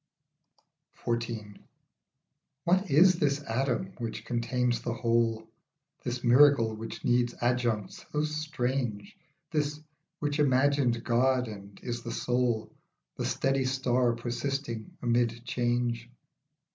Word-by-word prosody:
XIV. 115 Hz, -3 st, -3 dB, 1.0 s
WHAT 185 Hz, +3 st, +2 dB
is 175 Hz, +5 st, +6 dB
this 145 Hz, -2 st, +1 dB
atom 115 Hz, -6 st, -1 dB
which 115 Hz, -2 st, -5 dB
contains 120 Hz, 0 st, 0 dB
the 120 Hz, -, -3 dB
whole, 115 Hz, -2 st, +1 dB, 0.6 s
This 120 Hz, 0 st, -3 dB
miracle 125 Hz, -2 st, +5 dB
which 110 Hz, +1 st, -7 dB
needs 120 Hz, 0 st, +2 dB
adjuncts 120 Hz, -4 st, 0 dB
so 150 Hz, 0 st, 0 dB
strange, 140 Hz, -, -2 dB, 0.4 s
This, 150 Hz, -1 st, -1 dB, 0.4 s
which 145 Hz, 0 st, -2 dB
imagined 130 Hz, -3 st, +3 dB
God 125 Hz, +1 st, +2 dB
and 100 Hz, -2 st, -10 dB
is 120 Hz, -1 st, -3 dB
the 115 Hz, -, -5 dB
soul, 120 Hz, -3 st, 0 dB, 0.4 s
The -, -, -2 dB
steady 135 Hz, 0 st, +1 dB
star 130 Hz, -2 st, +2 dB
persisting 120 Hz, -1 st, -4 dB
amid 120 Hz, -1 st, +1 dB
change 120 Hz, -1 st, -1 dB
120 Hz, 105 wpm, -29 LUFS, 115-135 Hz, 1.0 s, is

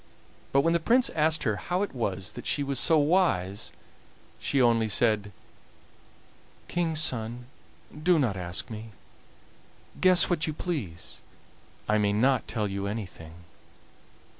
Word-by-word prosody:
But 140 Hz, -, +4 dB
when 165 Hz, +3 st, +2 dB
the 170 Hz, -, +2 dB
Prince 240 Hz, +9 st, +3 dB
asked 155 Hz, 0 st, +1 dB
her 105 Hz, -5 st, 0 dB
how 180 Hz, -, -1 dB
it 205 Hz, -, -5 dB
was 95 Hz, -7 st, -3 dB
that -, -, -8 dB
she 145 Hz, -, +1 dB
was 140 Hz, -2 st, 0 dB
so 160 Hz, -, +4 dB
wise, 145 Hz, -, +1 dB, 0.7 s
she 140 Hz, -, 0 dB
only 115 Hz, -3 st, +3 dB
said: 105 Hz, -1 st, +1 dB, 1.4 s
"King's 165 Hz, -3 st, 0 dB
son, 120 Hz, -4 st, -1 dB, 0.6 s
do 175 Hz, +2 st, +4 dB
not 125 Hz, -9 st, +1 dB
ask 90 Hz, +3 st, -3 dB
me; 110 Hz, 0 st, -7 dB, 1.1 s
guess 185 Hz, -1 st, +5 dB
what 170 Hz, -3 st, 0 dB
you 155 Hz, -, -2 dB
please. 125 Hz, -, -5 dB, 0.7 s
I 105 Hz, 0 st, +2 dB
may 100 Hz, -1 st, +1 dB
not 130 Hz, +5 st, +2 dB
tell 105 Hz, -3 st, -2 dB
you 100 Hz, 0 st, -3 dB
anything." 85 Hz, -5 st, -7 dB
120 Hz, 140 wpm, -27 LUFS, 105-160 Hz, 1.4 s, guess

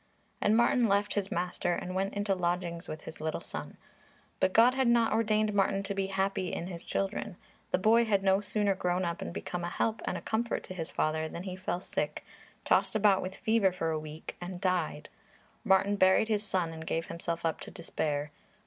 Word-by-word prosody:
And 215 Hz, +2 st, +4 dB
Martin 235 Hz, 0 st, +4 dB
left 200 Hz, 0 st, +2 dB
his 200 Hz, -1 st, -2 dB
master 175 Hz, 0 st, -1 dB
and 180 Hz, +1 st, -4 dB
went 195 Hz, +2 st, -1 dB
into 205 Hz, -1 st, +1 dB
lodgings 175 Hz, -1 st, -2 dB
with 155 Hz, 0 st, -6 dB
his 160 Hz, -, -10 dB
little 155 Hz, 0 st, -2 dB
son. -, -, -7 dB, 0.6 s
But 190 Hz, -, +3 dB
God 235 Hz, +5 st, +6 dB
had 265 Hz, -1 st, +2 dB
not 235 Hz, -2 st, +4 dB
ordained 215 Hz, -1 st, +2 dB
Martin 195 Hz, 0 st, +2 dB
to 200 Hz, +1 st, -3 dB
be 195 Hz, -1 st, -1 dB
happy 190 Hz, -1 st, -1 dB
in -, -, -3 dB
his 175 Hz, -1 st, -7 dB
children. 195 Hz, -1 st, -2 dB, 0.3 s
The -, -, +2 dB
boy 225 Hz, +5 st, +4 dB
had 200 Hz, -3 st, +2 dB
no 195 Hz, +1 st, +4 dB
sooner 205 Hz, 0 st, +1 dB
grown 180 Hz, -1 st, 0 dB
up 170 Hz, 0 st, -3 dB
and -, -, -4 dB
become 175 Hz, 0 st, -4 dB
a 175 Hz, -, -2 dB
help 220 Hz, +4 st, -1 dB
and -, -, -1 dB
a -, -, -7 dB
comfort 230 Hz, +1 st, -1 dB
to -, -, -7 dB
his 165 Hz, -3 st, -5 dB
father 155 Hz, +1 st, 0 dB
than 170 Hz, -, -6 dB
he 185 Hz, -1 st, -5 dB
fell 185 Hz, -1 st, -3 dB
sick, -, -, -3 dB, 0.4 s
tossed -, -, +3 dB
about 205 Hz, -3 st, +4 dB
with 185 Hz, +1 st, -5 dB
fever 220 Hz, -4 st, +3 dB
for 165 Hz, -3 st, -2 dB
a 155 Hz, -, -1 dB
week 155 Hz, +1 st, -8 dB
and 175 Hz, 0 st, -5 dB
died. 180 Hz, -5 st, -1 dB, 0.6 s
Martin 200 Hz, -1 st, +3 dB
buried 190 Hz, +3 st, +4 dB
his 210 Hz, -2 st, +2 dB
son 180 Hz, -5 st, -1 dB
and 160 Hz, 0 st, -8 dB
gave 165 Hz, 0 st, -1 dB
himself 170 Hz, 0 st, -4 dB
up 160 Hz, -, 0 dB
to -, -, -8 dB
despair. 150 Hz, -4 st, -3 dB
190 Hz, 210 wpm, -30 LUFS, 170-205 Hz, 0.6 s, God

